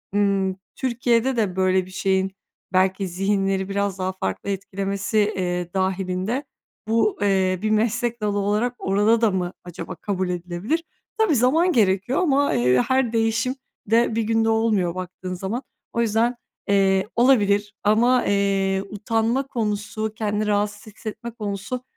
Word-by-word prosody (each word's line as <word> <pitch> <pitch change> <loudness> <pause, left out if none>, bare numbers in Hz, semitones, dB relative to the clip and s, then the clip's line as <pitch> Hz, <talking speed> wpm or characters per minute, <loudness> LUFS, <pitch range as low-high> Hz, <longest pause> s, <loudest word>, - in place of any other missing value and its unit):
ımm, 195 -2 +2 0.2
Türkiye'de 245 0 +1
de 195 -5 0
böyle 185 -1 +2
bir 185 - -13
şeyin 190 0 0 0.4
belki 190 +1 +2
zihinleri 195 +1 0
biraz 200 -1 -1
daha 185 0 -1
farklı 95 - -4
etkilemesi, 195 +2 -2 0.2
eee, 180 -1 -2
dâhilinde 190 +6 -1 0.4
bu, 230 - +2
eee, 190 -2 +2
bir 215 - 0
meslek 230 +2 0
dalı 205 -1 0
olarak 210 +5 0
orada 205 +4 +2
da 220 -3 +4
mı 180 -1 -2
acaba 175 +1 -7
kabul 185 +1 -2
edilebilir? 180 - -2 0.3
Tabii, 435 -10 +3
zaman 310 +10 +3
gerekiyor 205 - +2
ama, 285 -5 +2
eee, 125 +1 +3
her 260 -3 +1
değişim 230 +3 +1 0.3
de 230 0 +3
1 230 - +1
günde 225 0 +2
olmuyor 215 -6 +1
baktığın 185 0 -6
zaman. 200 +8 -4 0.3
O 235 - +1
yüzden, 230 +2 +2 0.3
eee, 195 -1 +3
olabilir 205 -5 +3
ama, 240 +4 +3
eee, 195 -1 +1
utanma 225 +5 0
konusu, 215 -2 -2
kendini 210 -1 -1
rahatsız 205 0 -1
hissetme 230 +2 -6
konusu 210 +3 -4
205 Hz, 140 wpm, -23 LUFS, 190-230 Hz, 0.4 s, da